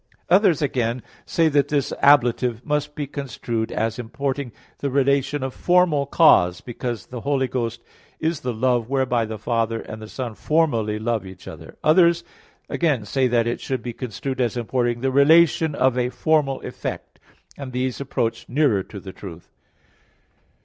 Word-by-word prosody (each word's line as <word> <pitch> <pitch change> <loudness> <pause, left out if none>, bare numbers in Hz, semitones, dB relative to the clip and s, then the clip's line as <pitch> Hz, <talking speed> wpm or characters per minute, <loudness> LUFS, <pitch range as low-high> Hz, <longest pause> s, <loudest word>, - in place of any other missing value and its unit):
Others, 185 -5 +4
again, 120 -3 -1 0.2
say 165 -1 +2
that 145 -2 +2
this 145 -3 -1
ablative 125 -4 +3
must 150 -1 -1
be 145 - -3
construed 120 -5 -4
as 110 +1 -2
importing 135 +2 -3 0.3
the 140 - -2
relation 140 +1 +1
of 130 -1 -3
formal 175 -6 +2
cause, 90 - +4
because 120 -3 -5
the 125 -2 -8
Holy 135 -1 0
Ghost 115 -2 -3 0.4
is 160 -1 -1
the 125 -4 -3
love 120 0 0
whereby 130 -4 +1
the 110 0 -6
Father 115 +1 -1
and 110 0 -8
the 110 - -8
Son 125 -2 -5
formally 115 -7 0
love 110 -1 -1
each 95 -1 -12
other. - - -10
Others, 170 +1 +4 0.4
again, 145 -11 0
say 130 +5 +1
that 120 -2 +2
it 120 - -2
should 130 -3 -3
be 120 - -5
construed 130 +3 -4
as 120 -1 0
importing 120 0 -1
the 135 0 0
relation 160 +3 +4
of 130 -2 +2
a 125 0 0
formal 145 0 +1
effect; - - -7 0.4
and 140 -2 -7
these 125 +1 -2
approach 115 -4 -2
nearer 130 -6 +2
to 100 +2 -9
the 95 0 -10
truth. 85 -4 -11
130 Hz, 165 wpm, -22 LUFS, 115-145 Hz, 0.4 s, Others